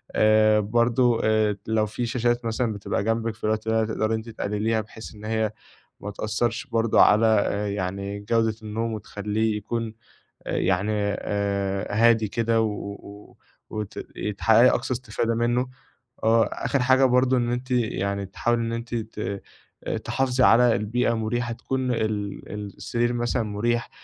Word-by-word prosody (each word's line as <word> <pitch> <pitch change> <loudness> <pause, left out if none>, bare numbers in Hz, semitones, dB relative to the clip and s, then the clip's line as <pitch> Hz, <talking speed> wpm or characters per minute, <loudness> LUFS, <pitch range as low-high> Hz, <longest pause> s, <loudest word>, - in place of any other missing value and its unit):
آآ، 110 0 +5
برضو 120 +3 +2
آآ، 110 -1 +3
ت 100 - -14
لو 110 -1 +2
في 120 +3 -3
شاشات 120 -1 0
مثلًا 115 0 -1
بتبقى 100 -1 -2
جنبِك 115 0 -1
في - - -25
الوقت 110 +1 -1
ده 110 0 +2
تقدري 110 0 -1
أنتِ 110 +1 -6
تِقَلليها، 110 +1 -1
بحيث 110 +1 -11
إن 105 0 -11
هي 110 -1 0 0.5
ما 105 - -6
تأثّرش 115 +4 -2
برضو 115 -3 +1
على 110 +2 +6 0.5
يعني 100 +1 -3
جودة 115 +1 +1
النوم 110 +1 -3
وتخلّيه 105 +1 -2
يكون 115 +1 -3 0.5
آآ - - -1
يعني 95 +3 +1 0.3
آآ، 100 -1 -1
هادي 115 -1 +4
كده 115 +1 +1
و 100 -1 -6 0.3
وت 105 -2 -5 0.2
ي 105 - -3
تحققي 115 +4 +5
أقصى 130 - 0
استفادة 115 -2 -2
منه. 120 +2 +1 0.6
آه، 115 0 +4
آخر 140 - -1
حاجة 130 +1 +4
برضو 125 +1 +3
إن 120 0 0
أنتِ 125 +2 -4
يعني 100 -4 0
تحاولي 115 +5 -1
إن 115 0 -2
أنتِ 115 +1 -4
ت 105 -3 -4 0.6
تحافظي 130 -1 +1
على 120 0 +6
البيئة 115 +3 0
مُريحة، 120 +2 -2
تكون 130 +2 -2
ال 105 -3 -2 0.3
السرير 120 0 -1
مثلًا 120 0 0
مُريح، 115 +3 -1
110 Hz, 150 wpm, -25 LUFS, 105-120 Hz, 0.6 s, على